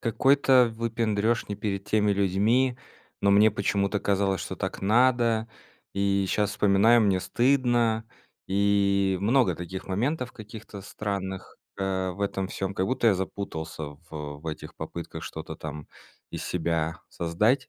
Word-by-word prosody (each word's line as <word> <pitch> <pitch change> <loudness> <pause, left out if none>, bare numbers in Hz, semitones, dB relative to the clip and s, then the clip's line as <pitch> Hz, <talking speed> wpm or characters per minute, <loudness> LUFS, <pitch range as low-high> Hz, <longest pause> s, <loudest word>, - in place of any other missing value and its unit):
какой-то 130 0 +4
выпендрёж 115 -1 0
не 100 - -4
перед 100 -2 -3
теми 105 -1 +2
людьми, 105 +7 +2 0.4
но 100 - +3
мне 105 +2 +6
почему-то 100 0 0
казалось, 100 -2 +1
что - - -5
так - - -4
надо. 115 +1 +3 0.5
И 100 -1 +1
щас 105 -1 +1
вспоминаю- 105 +3 +4
мне 100 -4 +3
стыдно. 120 0 +2 0.4
И 100 -1 +2
много 125 +5 +3
таких 90 +2 -7
моментов 125 +7 -1
каких-то 110 -2 -10
странных, 95 -2 -5 0.2
э, 95 -1 -1
в 95 +3 -9
этом 95 -1 -1
всём. 95 0 -4
Как 95 - 0
будто 120 -1 +2
я 100 - +4
запутался 80 -5 -5 0.3
в 75 -2 -6
в 80 - -12
этих 80 -1 -6
попытках 85 -1 -7
что-то 80 +1 -7
там 75 -1 -7 0.4
из - - -5
себя 80 -2 -1
создать. 105 +11 0
100 Hz, 140 wpm, -27 LUFS, 95-115 Hz, 0.5 s, мне